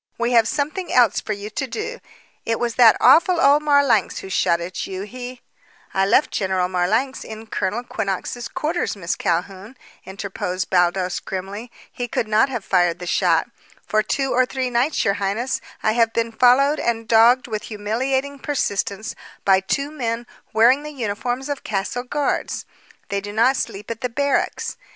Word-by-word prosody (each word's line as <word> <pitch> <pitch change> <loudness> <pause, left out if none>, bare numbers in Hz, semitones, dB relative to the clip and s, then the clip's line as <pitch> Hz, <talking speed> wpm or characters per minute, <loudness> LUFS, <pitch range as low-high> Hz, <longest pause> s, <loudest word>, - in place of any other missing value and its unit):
We 235 +1 0
have 230 -2 +5
something 305 +8 -2
else 240 -5 +4
for 215 - -3
you 205 +1 -7
to 265 +5 -3
do. 435 - -5 0.4
It 225 0 -1
was 240 -1 -1
that 230 -2 +6
awful 345 +1 +5
old 290 -1 +5
Marlanx 285 -8 +3
who 190 - -9
shot 170 -2 +2
at 175 +2 -5
you. 190 0 -5
He 250 +3 -8 0.3
" - - -29
"I 195 0 +2
left 250 +8 +3
General 190 -2 0
Marlanx 215 +9 0
in 220 0 -9
Colonel 210 +2 -2
Quinnox's 220 +1 -3
quarters, 325 -2 -2
Miss 180 -3 -2
Calhoun," 190 +7 -3 0.3
interposed 190 -1 -4
Baldos 180 0 +2
grimly. 200 +5 -6 0.2
"He 245 - -4
could 225 - -2
not 215 +5 +3
have 240 -6 -4
fired 175 -2 +2
the 180 - -7
shot. 175 - +2 0.4
For 215 - +2
two 270 +4 -1
or 255 0 +3
three 260 -1 -2
nights, 245 +6 +1
your 195 - +3
highness, 225 +7 -1 0.2
I 215 - +3
have 230 0 +2
been 230 0 0
followed 265 +6 +4
and 230 -1 -1
dogged 235 +3 +5
with 215 -3 -4
humiliating 260 +7 -2
persistence 215 -7 -2 0.3
by 190 -1 +5
two 275 +9 -2
men 235 -5 -3 0.3
wearing 240 +5 +5
the 300 - -7
uniforms 245 +2 -3
of 285 -2 -4
castle 205 +4 -2
guards. 280 +3 -2 0.4
They 200 -1 -1
do 205 +1 -7
not 235 +5 +3
sleep 205 -3 -4
at 230 - -6
the 250 - -1
barracks. 280 - -1
230 Hz, 175 wpm, -21 LUFS, 200-260 Hz, 0.4 s, that